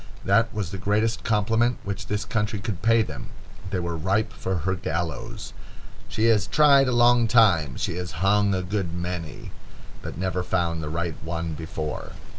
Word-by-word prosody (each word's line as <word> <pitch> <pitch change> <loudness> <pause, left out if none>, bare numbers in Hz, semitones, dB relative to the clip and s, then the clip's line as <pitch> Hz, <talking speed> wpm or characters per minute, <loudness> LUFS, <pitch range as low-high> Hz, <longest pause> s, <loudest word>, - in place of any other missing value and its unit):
That 115 +4 +3
was 100 -6 -3
the 100 - -5
greatest 110 +3 0
compliment 115 +3 +2
which 100 0 -5
this 105 +1 -2
country 105 -1 -1
could 100 -2 -4
pay 115 +1 +4
them. 70 - -7 0.4
They 95 - -1
were 85 -1 -3
ripe 100 +7 0
for 95 - -3
her 95 - +2
gallows. 85 -5 -4 0.6
She 110 - 0
has 110 -4 +3
tried 140 -3 +5
a - - +1
long 120 -1 +5
time, 95 - +4
she 85 - -2
has 90 -2 -5
hung 100 +3 +2
a 95 - -2
good 90 -2 -2
many, 85 -2 -5 0.5
but - - -7
never 90 0 -1
found 85 -2 -1
the 75 - -4
right 85 0 -2
one 80 0 -3
before. 80 -1 -5
95 Hz, 175 wpm, -25 LUFS, 85-110 Hz, 0.6 s, tried